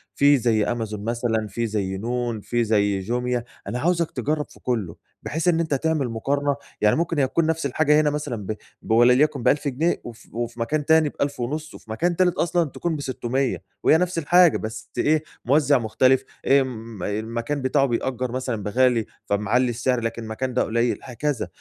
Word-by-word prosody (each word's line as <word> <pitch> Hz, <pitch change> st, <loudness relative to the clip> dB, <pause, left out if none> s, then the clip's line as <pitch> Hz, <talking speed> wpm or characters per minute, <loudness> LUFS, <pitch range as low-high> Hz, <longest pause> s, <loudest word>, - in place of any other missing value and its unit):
في 145 Hz, 0 st, +5 dB
زي 115 Hz, -4 st, +2 dB
أمازون 110 Hz, -3 st, -3 dB
مثلًا 115 Hz, -1 st, -1 dB
في 115 Hz, +4 st, -2 dB
زي 100 Hz, -3 st, -2 dB
نون 120 Hz, +1 st, -2 dB
في 120 Hz, +3 st, 0 dB
زي 100 Hz, -3 st, +2 dB
جوميا، 120 Hz, +4 st, -1 dB, 0.2 s
أنا 125 Hz, -, -3 dB
عاوزك 170 Hz, +2 st, +1 dB
تجرب 150 Hz, +4 st, -1 dB
في -, -, -17 dB
كلّه، 110 Hz, -9 st, -2 dB, 0.3 s
بحيث 160 Hz, +3 st, -2 dB
إن 170 Hz, -2 st, +4 dB
أنت 160 Hz, -3 st, 0 dB
تعمل 145 Hz, -2 st, 0 dB
مقارنة، 140 Hz, +5 st, 0 dB, 0.3 s
يعني 105 Hz, 0 st, +4 dB
ممكن 165 Hz, -1 st, 0 dB
هي 135 Hz, -, +3 dB
تكون 165 Hz, +5 st, +1 dB
نفس 160 Hz, -1 st, -1 dB
الحاجة 150 Hz, +2 st, +3 dB
هنا 150 Hz, -, +2 dB
مثلًا 150 Hz, -4 st, -3 dB
ب 110 Hz, -, -3 dB, 0.3 s
بوليَكُن 125 Hz, +4 st, +3 dB
ب1000 145 Hz, +4 st, +2 dB
جنيه 150 Hz, +6 st, 0 dB
وف 120 Hz, -2 st, -11 dB
وفي 120 Hz, +1 st, -4 dB
مكان 145 Hz, +6 st, -1 dB
تاني 160 Hz, -1 st, +4 dB
ب1500 145 Hz, +3 st, -3 dB
وفي 110 Hz, -, -11 dB
مكان 170 Hz, +10 st, 0 dB
تالت 180 Hz, 0 st, +2 dB
أصلًا 170 Hz, -2 st, +1 dB
تكون 170 Hz, +3 st, -3 dB
ب600 130 Hz, -2 st, -2 dB, 0.2 s
وهي 160 Hz, -, +6 dB
نفس 180 Hz, 0 st, -1 dB
الحاجة 170 Hz, +1 st, +5 dB
بس 110 Hz, +1 st, -7 dB
إيه 155 Hz, +1 st, +2 dB, 0.2 s
موزِّع 140 Hz, +2 st, +4 dB
مختلف، 130 Hz, +3 st, +2 dB, 0.2 s
إمم، 115 Hz, -7 st, +1 dB
المكان 115 Hz, +7 st, -2 dB
بتاعه 135 Hz, +2 st, +2 dB
بيأجر 125 Hz, 0 st, -2 dB
مثلًا 125 Hz, -4 st, -3 dB
بغالي 120 Hz, +2 st, +2 dB, 0.2 s
فمعلّي 105 Hz, +5 st, +1 dB
السعر 120 Hz, +2 st, 0 dB
لكن 115 Hz, 0 st, -4 dB
مكان 125 Hz, +4 st, -3 dB
ده 125 Hz, -, +2 dB
قليل 115 Hz, +2 st, 0 dB
هكذا، 135 Hz, +2 st, -2 dB
125 Hz, 175 wpm, -23 LUFS, 115-150 Hz, 0.3 s, وهي